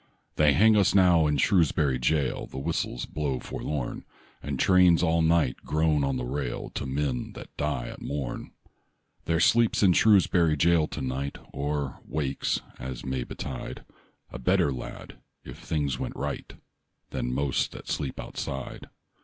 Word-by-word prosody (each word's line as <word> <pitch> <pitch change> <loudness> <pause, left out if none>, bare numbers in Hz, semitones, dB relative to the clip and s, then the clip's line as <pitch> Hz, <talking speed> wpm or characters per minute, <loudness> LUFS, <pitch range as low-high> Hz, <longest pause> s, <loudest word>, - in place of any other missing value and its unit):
They 75 -2 +4
hang 110 +6 +5
us 100 -2 +3
now 90 -5 +5
in 75 -1 +1
Shrewsbury 75 -5 +2
jail: 70 +2 0
The - - -10
whistles 80 +5 -2
blow 70 -4 -2
forlorn, 75 -5 -4 0.4
And 70 -2 -3
trains 90 -3 +5
all 85 -1 +3
night 80 -5 +2
groan 75 -1 +1
on 70 -1 0
the 60 - -3
rail 65 -1 -4
To - - -4
men 65 -2 -2
that - - -11
die 75 -5 -2
at - - -9
morn. 70 -4 -4 0.8
There 80 -1 +1
sleeps 115 +4 +4
in 95 -3 +6
Shrewsbury 90 -6 +4
jail 80 0 +3
to - - -6
night, 65 +2 -3 0.2
Or 70 0 -3
wakes, 70 -3 -2 0.2
as 65 -1 -6
may 65 -1 -2
betide, 65 +1 -7 0.5
A 65 - -7
better 65 +2 +2
lad, 65 - -8 0.2
if - - -10
things 70 -5 -2
went - - -4
right, - - -4 0.6
Than - - -2
most 70 +1 0
that - - -10
sleep 70 -3 -3
outside. 65 -2 -6
75 Hz, 155 wpm, -27 LUFS, 65-85 Hz, 0.8 s, in